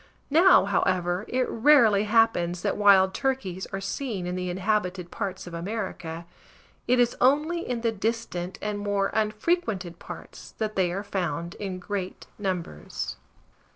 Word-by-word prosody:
Now, 340 - +6
however, 180 -1 0
it 255 0 0
rarely 230 -5 +5
happens 205 -6 +2
that - - 0
wild 195 -2 +5
turkeys 225 -9 -2
are 195 - -4
seen 195 -1 -3
in 180 - -3
the 180 0 -3
inhabited 185 -1 -1
parts 195 -3 -4
of 175 - -9
America. 170 -3 -5 0.6
It 250 +1 +3
is 240 -1 +3
only 300 +6 +3
in 240 -2 -2
the 230 -1 +1
distant 215 -4 -3
and 210 -1 -2
more 205 -1 0
unfrequented 215 - -1
parts - - -10
that 215 -1 -2
they 185 -2 +2
are 195 +3 -3
found 175 -4 -3
in 195 -3 -4
great 185 0 -5
numbers. 180 - -4
200 Hz, 145 wpm, -26 LUFS, 180-225 Hz, 0.6 s, Now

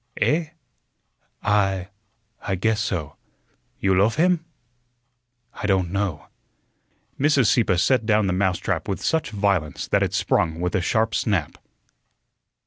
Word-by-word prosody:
"Eh?" 160 +2 +1 1.0
"I 95 -3 +1 0.5
I 95 - -2
guess 110 +4 0
so." 85 -8 -3 0.6
"You 95 0 +2
loaf 100 +5 +3
him?" 175 0 +2 1.1
"I 105 - -4
don't 95 -3 +1
know." 95 -8 -2 0.9
Mrs. 140 -2 +3
Sieppe 105 -3 +3
set 115 +4 +2
down 105 -1 +3
the 95 - 0
mousetrap 95 -2 -1
with 95 - -3
such 160 -3 0
violence 100 -8 -1
that - - +2
it - - 0
sprung 80 -1 0
with 90 +1 -2
a 95 - +1
sharp 110 +4 0
snap. 95 -9 -1
100 Hz, 130 wpm, -23 LUFS, 90-110 Hz, 1.1 s, loaf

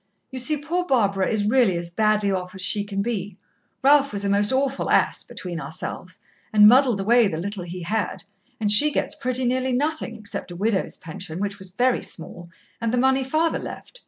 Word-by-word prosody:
You 260 - -4
see, 300 +5 +2
poor 345 +5 -2
Barbara 200 - +2
is 210 -2 0
really 220 -5 +3
as 170 0 -5
badly 215 +1 +1
off 185 0 -4
as 190 - -5
she 205 +2 +1
can 200 -1 -3
be. 205 -4 -4 0.5
Ralph 280 0 +5
was 200 -1 -4
a - - 0
most 205 +3 +3
awful 270 +1 0
ass, - - +2
between 175 -2 -7
ourselves, 180 +2 -6 0.3
and 210 -1 +7
muddled 250 -2 +5
away 230 +3 +4
the 160 - -3
little 190 +1 -4
he 175 0 -7
had, 215 +6 -2 0.4
and 210 -2 +1
she 250 +9 +6
gets - - -1
pretty 255 +1 -1
nearly 255 +1 0
nothing, 290 -3 -2
except 210 -3 -6
a 175 - -8
widow's 200 +1 -1
pension, 160 +1 -8
which 200 0 -3
was 190 -1 -5
very 245 +7 +1
small, 170 +1 -6 0.3
and 230 -1 0
the 250 - 0
money 265 +1 +3
father 315 +5 0
left. - - -9
215 Hz, 200 wpm, -23 LUFS, 190-255 Hz, 0.5 s, and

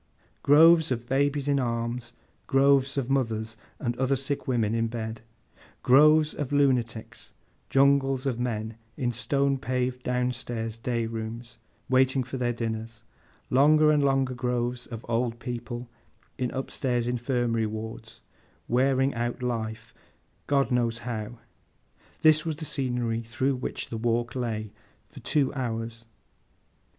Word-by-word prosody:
Groves 160 +2 +6
of 120 -1 -2
babies 140 +1 +1
in 140 -1 +2
arms; 120 0 -2 0.3
groves 135 0 +3
of 135 -3 0
mothers 115 -5 -1 0.2
and 120 -2 -2
other 130 +1 +2
sick 135 +2 -3
women 115 -4 +1
in 115 0 +1
bed; 110 -1 -5 0.6
groves 150 +4 +6
of 145 -2 -4
lunatics; 125 -6 0 0.4
jungles 135 -1 +3
of 125 -3 -1
men 110 -2 -3 0.2
in 125 -3 0
stone 135 +4 0
paved 125 -1 -2
down 125 0 0
stairs 115 -2 -5
day 115 -1 -1
rooms, 115 +1 -6 0.3
waiting 130 0 +3
for 125 +2 -6
their 120 -1 0
dinners; 115 -1 -5 0.5
longer 150 +3 +5
and 150 -1 +3
longer 135 -2 +2
groves 125 0 -2
of 115 -1 -8
old 115 0 0
people, 120 0 -6 0.5
in 125 -1 -2
up 135 0 -4
stairs 120 -2 -1
Infirmary 120 -2 0
wards, 110 +1 -7 0.5
wearing 135 +2 +2
out 120 +1 -3
life, 110 -3 -3 0.5
God 140 -1 +2
knows 120 -2 +1
how—this 120 +6 -2
was 160 -2 -2
the 155 +1 -6
scenery 125 -5 -1
through 120 +4 -1
which 125 - -4
the 115 - -4
walk 120 +1 0
lay, 110 -4 -3 0.4
for - - -12
two 140 -3 0
hours. 115 -3 -4
125 Hz, 135 wpm, -27 LUFS, 115-135 Hz, 0.6 s, Groves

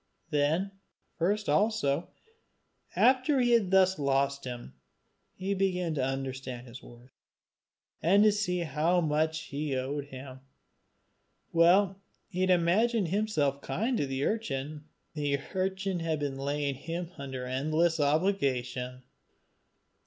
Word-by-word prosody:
Then 155 +7 +1 0.4
first 200 +5 0
also, 205 -8 +1 0.9
after 260 +2 +4
he 240 -1 +3
had 225 -6 +4
thus 190 -2 +4
lost 140 0 +1
him, 120 -1 -7 0.6
he 195 +2 -2
began 180 -3 0
to 140 -4 -1
understand 130 -2 -4
his 125 0 -11
worth, 120 +2 -15 0.9
and 195 +6 +5
to 215 - +6
see 190 -4 -1
how 170 +2 +1
much 155 0 0
he 145 -1 -2
owed 135 +2 -2
him. 130 -1 -10 1.1
While 190 +3 +4 0.3
he 185 - -4
had 185 - +2
imagined 185 +4 +3
himself 155 -9 0
kind 225 - -1
to 140 - 0
the 135 +1 -1
urchin, 150 -8 -3 0.3
the 145 -2 0 0.2
urchin 190 0 -1
had 165 -1 -1
been 145 -2 -2
laying 140 0 -1
him 165 +5 -5
under 130 -2 -5
endless 155 +6 +1
obligation. 135 -6 0
155 Hz, 125 wpm, -29 LUFS, 135-190 Hz, 1.1 s, to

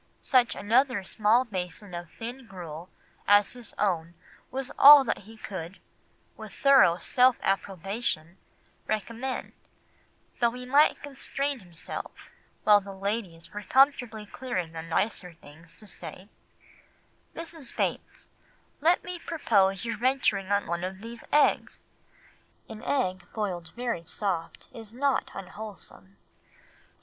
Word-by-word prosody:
Such 250 -3 +3
another 235 0 +2
small 220 +6 +2
basin 185 -2 -6
of 175 -1 -6
thin 240 +2 -7
gruel 175 -3 -8 0.4
as 205 0 +5
his 245 -3 -7
own 170 -4 0 0.3
was 265 0 -4
all 285 0 +11
that 225 - -3
he 225 - -13
could, 190 -4 -7 0.6
with - - -10
thorough 265 - +5
self 250 +5 +3
approbation, 195 -2 -2 0.5
recommend; 230 +5 -3 0.9
though 235 -1 +3
he 250 0 -7
might 285 +4 +4
constrain 280 0 -3
himself, 175 -4 -9 0.3
while 210 -1 +6
the 195 0 -9
ladies 195 -4 -4
were 210 - -5
comfortably 245 -4 +2
clearing 195 -7 -4
the 165 0 -6
nicer 180 +2 -2
things, 160 +1 -16
to 215 - -13
say— 195 0 -9 1.1
"'Mrs. 325 -5 -7
Bates, - - -3 0.5
let 335 +4 +3
me 360 -1 -6
propose 200 - +1
your 230 -2 -2
venturing 240 -6 +1
on 200 0 +2
one 170 +1 -3
of 190 +1 -5
these 230 +1 -9
eggs. 295 - +2 0.8
An 220 - -9
egg 195 -9 -1
boiled 180 -6 -3
very 240 -7 -2
soft 170 0 -3
is 225 -1 -10
not 275 +1 +1
unwholesome. 195 0 -9
210 Hz, 125 wpm, -28 LUFS, 185-250 Hz, 1.1 s, all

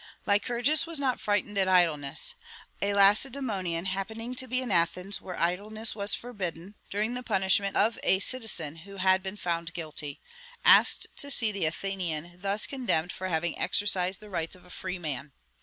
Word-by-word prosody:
"Lycurgus 245 +9 +2
was 330 -1 -2
not 260 -3 0
frightened 205 0 0
at 190 - +3
idleness! 165 -7 +2 0.5
A 200 - +1
Lacedemonian, 200 -4 +2
happening 220 +5 -4
to 260 +1 -1
be 255 +1 +1
in 255 -4 -3
Athens 180 +3 +1
(where 185 -2 -7
idleness 210 +6 0
was 200 -1 +3
forbidden) 190 -6 -6 0.2
during 215 +4 0
the 250 - -4
punishment 195 -3 +1
of 225 +1 +2
a 190 - +3
citizen 195 - -3
who 195 +4 -10
had 190 0 +3
been 190 +2 -6
found 170 -2 -3
guilty, 155 -3 -5 0.5
asked - - +6
to 285 - -4
see 230 -5 +4
the 200 -5 -2
Athenian 175 -1 -4
thus 200 +2 +3
condemned 235 - -1
for 185 - -5
having 170 -1 -2
exercised 190 -2 +2
the 210 - -12
rights 165 -2 -3
of 180 - -18
a 180 - -16
free 185 0 -5
man.... 145 -4 -6
195 Hz, 170 wpm, -28 LUFS, 175-215 Hz, 0.5 s, asked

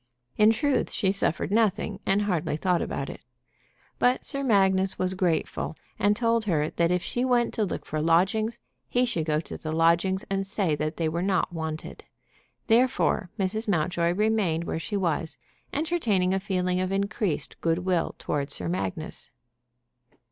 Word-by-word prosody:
In 215 0 +6
truth 280 +3 +1
she 190 - +1
suffered 195 -2 -1
nothing, 210 -2 +1
and 200 +2 +3
hardly 170 -6 -1
thought 180 +1 +1
about - - -3
it. - - -8 0.8
But 250 +1 +2
Sir 275 -2 -2
Magnus 190 -6 +3
was 185 0 0
grateful, 175 -3 -1 0.2
and 205 +1 +3
told 230 -1 +1
her 155 -6 +1
that 170 0 +1
if 180 0 +1
she 245 - -2
went 245 -2 +2
to 215 - 0
look 185 - -5
for 155 0 -2
lodgings 195 +8 +2 0.3
he 245 +1 +2
should 170 -10 -1
go 155 -1 +1
to - - -8
the 155 - -4
lodgings 170 +4 +2
and 195 0 -2
say 195 -5 0
that 155 +1 -3
they 165 - 0
were 170 +2 -1
not 190 -2 0
wanted. 160 -1 -5 0.6
Therefore 240 -5 +2
Mrs. 210 +3 0
Mountjoy 170 -2 +1
remained 205 -5 +1
where 160 - -3
she 205 +5 -3
was, 165 -4 -1 0.3
entertaining 240 - +1
a 195 - +1
feeling 180 -1 -1
of 185 0 -1
increased 200 -3 -2
good 165 0 +2
will 180 -3 0
toward 140 -1 -2
Sir 90 - -2
Magnus. 95 +2 -4
190 Hz, 165 wpm, -26 LUFS, 165-215 Hz, 0.8 s, In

